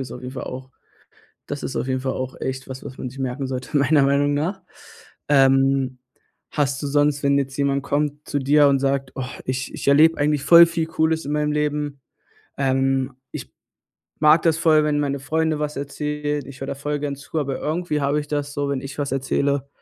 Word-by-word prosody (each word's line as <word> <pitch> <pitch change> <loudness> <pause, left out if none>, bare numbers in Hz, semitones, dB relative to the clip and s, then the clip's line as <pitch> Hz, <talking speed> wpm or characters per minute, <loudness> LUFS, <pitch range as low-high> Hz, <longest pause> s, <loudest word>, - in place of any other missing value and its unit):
ist 130 - -6
auf - - -8
jeden 125 - -6
Fall 135 - -6
auch 130 0 -8 0.8
das 145 0 -6
ist 135 - -4
auf - - -2
jeden 130 0 -1
Fall 130 0 -1
auch 130 0 -4
echt 130 0 -4
was, 130 0 -8
was 135 -2 -9
man 130 - -5
sich 135 - -12
merken 130 +1 -3
sollte, 130 +2 -3
meiner 140 +1 +4
Meinung 140 +1 +2
nach. 170 +7 -2 0.7
Ähm, 135 -2 +3 0.5
hast 140 -2 -1
du - - -1
sonst, 145 0 +1
wenn 140 0 +3
jetzt 135 -1 -2
jemand 140 -1 0
kommt, 145 +1 -2
zu 145 - -1
dir 145 +2 +5
und 140 -1 +3
sagt: 135 -1 -1
„Oh, 135 - -3 0.2
ich 130 0 -3
ich - - -6
erlebe 155 +4 +5
eigentlich 145 -1 +1
voll 170 +2 +9
viel 165 -1 -2
cooles 160 0 0
in 145 - -3
meinem 150 0 0
Leben? 150 -2 -2 0.6
Ähm, 135 0 +1 0.2
ich - - -8 0.7
mag 155 +1 +5
das 160 -1 +2
voll, 155 -2 +4
wenn 150 -1 +1
meine 140 -1 -1
Freunde 155 +2 0
was 150 0 -3
erzählen. 150 +1 -3
Ich 135 -1 -11
höre 135 - -4
da - - -3
voll 145 +1 -3
gern 140 -1 -3
zu, 145 +3 -5
aber 140 -3 -2
irgendwie 155 -1 -2
habe 140 +2 +1
ich 145 - -9
das 145 -1 -2
so, 145 0 -2
wenn 140 -2 -1
ich 140 +1 -8
was 140 -2 -2
erzähle, 140 +1 0
140 Hz, 210 wpm, -22 LUFS, 135-150 Hz, 0.8 s, voll